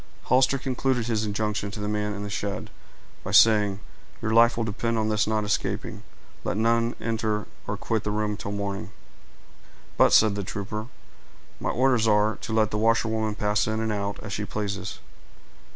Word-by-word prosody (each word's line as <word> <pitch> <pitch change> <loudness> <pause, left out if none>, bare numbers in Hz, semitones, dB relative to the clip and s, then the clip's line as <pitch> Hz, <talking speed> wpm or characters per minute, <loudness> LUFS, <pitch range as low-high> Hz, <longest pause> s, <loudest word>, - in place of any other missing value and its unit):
Hollister 130 +2 +3
concluded 130 -2 -1
his 110 -2 0
injunctions 105 0 -2
to - - -6
the 105 - -3
man 105 0 -1
in 100 - -5
the 105 - -5
shed, 100 0 -4 0.5
by - - -5
saying, 105 -1 +5 0.4
"Your 110 0 -1
life 115 0 +5
will 115 - 0
depend 115 +2 -1
on 110 0 0
his 105 0 +1
not 110 -1 +1
escaping. 105 0 -2 0.4
Let - - -2
none 115 +1 +2
enter 110 -2 -1 0.2
or - - -2
quit 110 -3 -1
the - - -2
room 105 0 -1
till 100 - -6
morning." 100 0 -3 1.1
"But," - - +5
said 110 -2 +6
the 100 0 -3
trooper, 105 +3 -5 0.7
"my - - -2
orders 125 -3 +2
are, 105 0 +3
to 115 - -7
let 110 -1 +2
the 105 - -1
washerwoman 110 -1 +1
pass 105 0 +1
in 110 0 -1
and 110 -1 -1
out, 100 -1 -2
as 110 0 -5
she 105 - -2
pleases." 100 -2 -4
110 Hz, 180 wpm, -26 LUFS, 105-115 Hz, 1.1 s, said